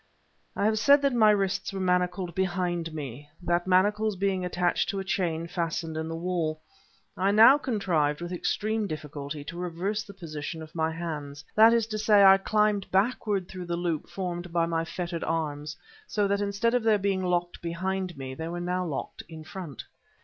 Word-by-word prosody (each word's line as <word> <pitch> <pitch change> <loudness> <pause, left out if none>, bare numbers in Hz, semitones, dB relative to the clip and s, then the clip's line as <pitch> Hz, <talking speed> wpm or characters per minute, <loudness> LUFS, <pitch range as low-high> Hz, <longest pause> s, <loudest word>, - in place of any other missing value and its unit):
I - - 0
have 215 0 +2
said 280 +5 +5
that 280 -2 +2
my 220 -3 +5
wrists 195 -2 +1
were 195 - -5
manacled 180 -1 0
behind 175 -2 -1
me, 145 -2 -7
the 175 0 +1
manacles 205 +3 +3
being 190 -1 0
attached 180 -1 0
to 200 - -2
a - - -3
chain 170 -4 -1
fastened 165 -2 -3
in 160 0 -3
the 165 - -4
wall. 165 -2 -2 0.6
I 190 +1 +1
now 225 +7 +7
contrived, 175 - 0
with 175 +1 -6
extreme 215 +4 -1
difficulty, 150 -2 -6
to 170 +4 -7
reverse 180 +4 -2
the 200 -1 -11
position 160 -2 -6
of 155 - -13
my 160 -1 0
hands; 150 -4 -6
that 225 +1 +7
is 230 -1 +3
to 215 -1 -4
say, 210 -1 +5
I 195 0 +8
climbed 210 -1 +1
backward 200 -2 +1
through 185 -2 -8
the 170 0 -2
loop 170 -3 -2
formed 175 -2 -4
by 170 -1 +2
my 165 -1 -1
fettered 170 -1 -4
arms, 150 -2 -3 0.3
so 205 -1 +1
that 200 +1 0
instead 205 +3 0
of 245 - +3
their 220 -1 +4
being 195 -1 0
locked 175 -1 -1
behind 185 0 -3
me, 130 -1 -6
they 160 +5 -5
now 175 +1 -2
were 180 - -3
locked 140 - -5
in 160 -1 -9
front. 170 - -8
180 Hz, 190 wpm, -27 LUFS, 165-200 Hz, 0.6 s, I